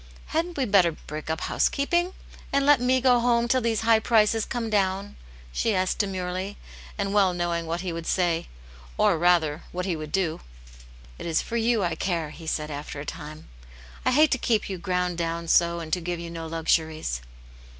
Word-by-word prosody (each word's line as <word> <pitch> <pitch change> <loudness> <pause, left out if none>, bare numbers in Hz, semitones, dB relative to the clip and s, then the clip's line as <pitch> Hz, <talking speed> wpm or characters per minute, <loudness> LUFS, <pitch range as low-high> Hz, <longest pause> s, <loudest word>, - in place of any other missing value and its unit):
Hadn't 335 +1 -1
we 270 - +1
better 190 -6 +4
break 155 0 -8
up 160 +1 -2
housekeeping 345 +6 +1 0.4
and 275 0 +2
let 290 -3 +5
me 255 +1 +3
go 250 -1 +5
home 235 0 +2
till 255 +1 +2
these 225 -2 0
high 225 0 +5
prices 220 -1 +3
come 240 -3 -3
down 200 -1 0 0.2
?" - - -20
she 215 - +1
asked 185 0 0
demiirely, 190 0 -2 0.4
and 200 -1 -1
well 195 -3 +3
knowing 170 -1 -1
what 170 +1 -2
he 180 -2 -3
would 165 0 -6
say, 170 -3 +1 0.5
or - - +4
rather, 170 -3 +3
what 180 0 -3
he 185 -3 -1
would 155 -1 -7
do. 180 -5 0 0.4
" - - -20
It - - -5
is 160 -1 +1
for 235 - -5
you 230 -2 +2
I 175 -2 0
care," 165 -2 -2
he 160 +1 -11
said, 150 -1 -2
after 145 0 -6
a 140 - -6
time. 150 +2 -8 0.3
" - - -19
I - - +2
hate 300 +4 +5
to 260 - +2
keep 220 -4 0
you 185 - -4
ground 180 -1 -1
*down 170 0 -2
so 170 +1 +3
and 160 -2 -6
to 180 - +1
give 175 0 -3
you 170 0 -6
no 165 -1 -6
luxuries." 160 - 0
180 Hz, 205 wpm, -26 LUFS, 165-225 Hz, 0.5 s, let